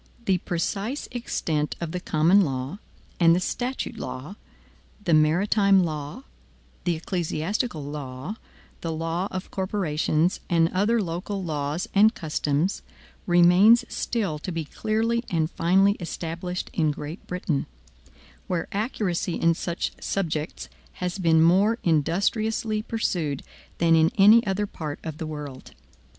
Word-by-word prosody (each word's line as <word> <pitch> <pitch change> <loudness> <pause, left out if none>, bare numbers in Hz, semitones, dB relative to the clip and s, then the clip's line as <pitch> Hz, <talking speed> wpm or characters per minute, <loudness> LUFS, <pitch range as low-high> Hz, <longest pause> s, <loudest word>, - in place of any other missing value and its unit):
The 190 -4 +2
precise 200 - -2
extent 160 -11 -2
of 170 -2 -4
the 180 - -3
common 170 +4 +4
law, 135 +2 -2 0.4
and 165 -1 +6
the - - +2
statute 245 +3 -3
law, 150 +5 -6 0.7
the 170 - +1
maritime 190 +5 +4
law, 155 - -4 0.6
the 175 -2 +2
ecclesiastical 170 - -2
law, 140 +6 -6 0.4
the 165 - -3
law 165 +3 -2
of 185 0 -6
corporations, 175 -4 0
and 165 -1 +3
other 210 +5 +2
local 185 +3 -4
laws 150 +1 -2
and 215 +3 +5
customs, 155 +2 -1 0.5
remains 180 +7 +6
still 195 -10 -2
to 180 - -5
be 165 -2 -3
clearly 225 +7 0
and 160 -1 0
finally 195 +4 +3
established 175 +1 -4
in 155 -3 +2
Great 150 +4 -6
Britain, 180 -5 -2 0.8
where 175 -3 -1
accuracy 200 -5 -1
in 165 0 +3
such 170 +1 -3
subjects 160 -5 -2 0.3
has 180 +1 -4
been 160 -3 +4
more 195 +7 +4
industriously 210 +7 +1
pursued 175 - -2 0.3
than 165 -1 +4
in 160 0 +4
any 215 +4 +7
other 195 +2 0
part 155 -6 -6
of 155 -2 -6
the 160 - -4
world. 145 -4 -8
175 Hz, 130 wpm, -25 LUFS, 160-200 Hz, 0.8 s, any